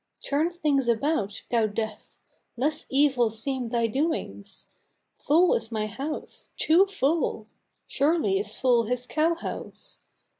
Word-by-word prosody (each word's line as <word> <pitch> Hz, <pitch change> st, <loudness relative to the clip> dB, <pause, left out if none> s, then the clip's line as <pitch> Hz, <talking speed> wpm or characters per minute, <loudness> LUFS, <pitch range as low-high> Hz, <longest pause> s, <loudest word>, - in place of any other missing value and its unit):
Turn 300 Hz, +4 st, +1 dB
things 295 Hz, -7 st, 0 dB
about, 230 Hz, -4 st, 0 dB
thou 230 Hz, -2 st, +3 dB
Death! 215 Hz, 0 st, -5 dB, 0.4 s
Less 300 Hz, +5 st, -1 dB
evil 265 Hz, -4 st, +3 dB
seem 245 Hz, +2 st, -3 dB
thy 235 Hz, -1 st, +1 dB
doings. 230 Hz, -, -2 dB, 0.5 s
Full 340 Hz, +5 st, +4 dB
is 225 Hz, 0 st, -2 dB
my 215 Hz, -1 st, -1 dB
house 275 Hz, +9 st, -6 dB
too 350 Hz, +5 st, +4 dB
full: 300 Hz, -, 0 dB, 0.4 s
surely 335 Hz, +7 st, +1 dB
is 415 Hz, -, -5 dB
full 245 Hz, -3 st, +3 dB
his 250 Hz, +2 st, -2 dB
cow 320 Hz, +5 st, +1 dB
house! 335 Hz, -, -7 dB
270 Hz, 125 wpm, -26 LUFS, 230-315 Hz, 0.5 s, Full